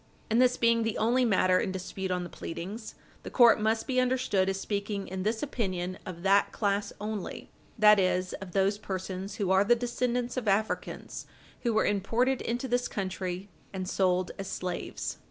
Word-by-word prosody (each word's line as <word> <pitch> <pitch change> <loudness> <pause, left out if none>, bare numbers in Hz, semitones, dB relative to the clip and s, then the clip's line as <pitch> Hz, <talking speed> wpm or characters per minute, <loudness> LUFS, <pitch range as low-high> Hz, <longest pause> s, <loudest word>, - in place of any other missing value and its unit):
And 230 +3 +4
this 250 0 +4
being 230 0 +3
the 225 -1 -1
only 245 +4 +3
matter 185 -4 +3
in 200 - -1
dispute 190 0 -4
on 180 -1 -1
the 175 - -7
pleadings, 200 +7 -6 0.3
the - - -7
court 235 -4 +6
must 220 +1 +1
be 255 -1 +1
understood 250 -7 +1
as 195 0 -2
speaking 200 0 -3
in 190 0 -4
this 220 +5 -1
opinion 185 -9 -3
of 175 -2 -7
that 195 +1 +4
class 200 -1 0
only, 210 -2 -5 0.3
that 210 -1 +7
is, 185 -1 +1
of 185 -3 -8
those 195 +1 +2
persons 190 0 -5
who 195 -3 -1
are 190 +1 +5
the 240 +4 +4
descendants 245 +1 -1
of 240 -4 -2
Africans 205 +2 -1 0.3
who 240 - +1
were 220 - +2
imported 230 +6 +1
into 240 +3 -2
this 245 0 +1
country 185 -1 -4 0.3
and 185 -1 -4
sold 185 -1 +1
as 195 - -4
slaves. 180 -2 -4
200 Hz, 180 wpm, -29 LUFS, 190-230 Hz, 0.3 s, that